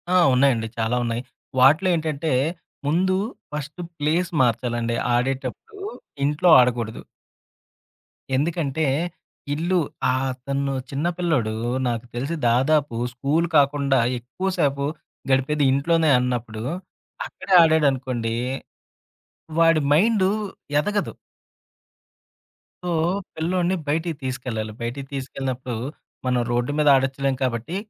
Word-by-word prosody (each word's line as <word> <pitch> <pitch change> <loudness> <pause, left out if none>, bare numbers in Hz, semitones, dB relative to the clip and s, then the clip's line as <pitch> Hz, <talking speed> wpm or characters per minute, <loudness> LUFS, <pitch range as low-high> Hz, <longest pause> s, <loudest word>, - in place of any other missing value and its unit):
ఆ! - - +7 0.2
ఉన్నాయండి. 125 -4 +3
చాలా 115 +2 +1
ఉన్నాయి. 115 +1 -2 0.4
వాటిలో 155 +9 +5
ఏంటంటే, 155 -1 -2 0.6
ముందు 185 +5 +2 0.4
ఫస్ట్ 150 +4 -5 0.2
ప్లేస్ 165 +4 +1
మార్చాలండి. 120 -1 0 0.2
ఆడేటప్పుడు 130 - -1 0.6
ఇంట్లో 150 +5 +2
ఆడకూడదు. 120 -3 +1 1.3
ఎందుకంటే, 155 0 0 0.7
ఇల్లు 175 +5 0 0.3
ఆ - - +1 0.3
తను 140 0 0 0.2
చిన్న 145 +5 -1
పిల్లోడు 155 -11 +1 0.4
నాకు 120 0 -2
తెలిసి 140 +7 -2
దాదాపు 135 +2 +2 0.2
స్కూలు 145 +7 0
కాకుండా 140 -2 +3 0.2
ఎక్కువసేపు 140 0 -1 0.5
గడిపేది 140 +3 +2
ఇంట్లోనే 160 +3 +2
అన్నప్పుడు. 120 -3 -2 0.6
అక్కడే 195 - -4
ఆడాడనుకోండి. 130 -7 +1 1.2
వాడి 165 -1 +5
మైండు 195 +3 +4 0.5
ఎదగదు. 205 +6 0 1.7
సో, 180 - -2 0.5
పిల్లోడిని 175 +3 0
బయటికి 160 +2 0
తీసుకెళ్ళాలి. 125 -4 -3
బయటికి 135 +4 -4
తీసుకెళ్ళినప్పుడు, 130 -2 -4 0.5
మనం 125 -1 +2
రోడ్డు 120 +3 0
మీద 150 -1 +2
ఆడొచ్చులేం 135 0 0
కాబట్టి, 120 +7 -2
140 Hz, 95 wpm, -23 LUFS, 125-160 Hz, 1.7 s, ఆ